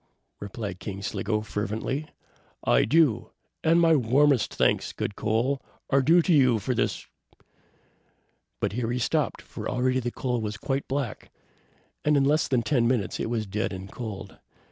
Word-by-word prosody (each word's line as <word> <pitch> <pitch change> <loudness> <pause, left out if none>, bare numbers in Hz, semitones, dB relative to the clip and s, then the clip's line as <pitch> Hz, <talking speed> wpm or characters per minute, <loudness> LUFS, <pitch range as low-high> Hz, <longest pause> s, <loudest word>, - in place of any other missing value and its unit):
replied 100 -2 -6
King 100 -1 -6
Sligo, 105 +2 -1
fervently, 110 +8 -3 0.6
"I - - +4
do, 130 -4 +3 0.3
and 165 +1 +4
my 165 -1 +5
warmest 135 0 +3
thanks, - - +1
good 100 - -3
Coal, 115 +5 0 0.3
are 135 - +5
due 165 +5 +5
to 175 - +3
you 130 -6 +5
for 110 +5 -2
this - - -1 0.7
" - - -41
But - - 0
here 115 +2 -2
he 120 - -1
stopped, 125 - -1
for - - -6
already 130 +1 +1
the 120 -1 -2
coal 125 -1 -2
was 105 0 -4
quite 135 +5 -2
black, 135 -5 -3 0.7
and 150 -1 +3
in 140 - +3
less 150 +3 +2
than 125 -3 +1
ten 120 -1 +2
minutes 115 -8 0
it - - -2
was 115 -2 -1
dead 105 +3 -2
and 95 0 -7
cold. 100 -5 -7
120 Hz, 165 wpm, -26 LUFS, 105-135 Hz, 0.7 s, my